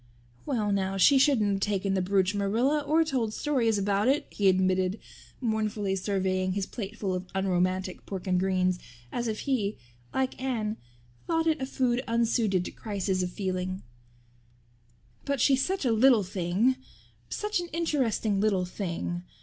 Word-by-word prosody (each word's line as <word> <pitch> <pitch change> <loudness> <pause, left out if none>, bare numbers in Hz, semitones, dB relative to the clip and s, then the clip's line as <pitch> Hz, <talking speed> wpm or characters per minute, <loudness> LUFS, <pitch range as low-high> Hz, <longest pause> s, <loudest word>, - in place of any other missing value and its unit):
"Well 220 -7 0
now, 195 -1 0
she 270 +8 +6
shouldn't 250 -7 +3
have 195 - 0
taken 195 -1 0
the 190 - +1
brooch, 190 +1 +2
Marilla, 225 +9 +1
or 310 +3 +2
told 250 -8 -1
stories 240 -7 +1
about 200 +2 +1
it," 285 +3 +2
he 200 -2 +3
admitted, 185 +1 +2 0.4
mournfully 215 -4 -1
surveying 185 -1 0
his 195 0 -1
plateful 205 -3 -4
of 185 0 -4
unromantic 185 -1 0
pork 190 -2 -5
and 180 -1 +2
greens 185 -1 +1 0.3
as 240 -1 -2
if 215 -1 -3
he, 220 -7 -1 0.3
like 260 -1 -2
Anne, 225 -5 -1 0.5
thought 325 -1 +1
it 320 -3 +1
a 265 - -2
food 255 -2 0
unsuited 230 -5 +1
to - - -5
crises 195 -3 -2
of 180 - -1
feeling, 185 -1 -3 1.4
"but 280 -1 -1
she's 270 +2 +4
such 380 -5 -1
a 245 - +3
little 230 -1 +5
thing 195 +7 +1 0.5
such 420 -2 -1
an 350 - -4
interesting 260 -11 0
little 195 -4 +2
thing. 175 -2 -4
205 Hz, 155 wpm, -28 LUFS, 190-255 Hz, 1.4 s, she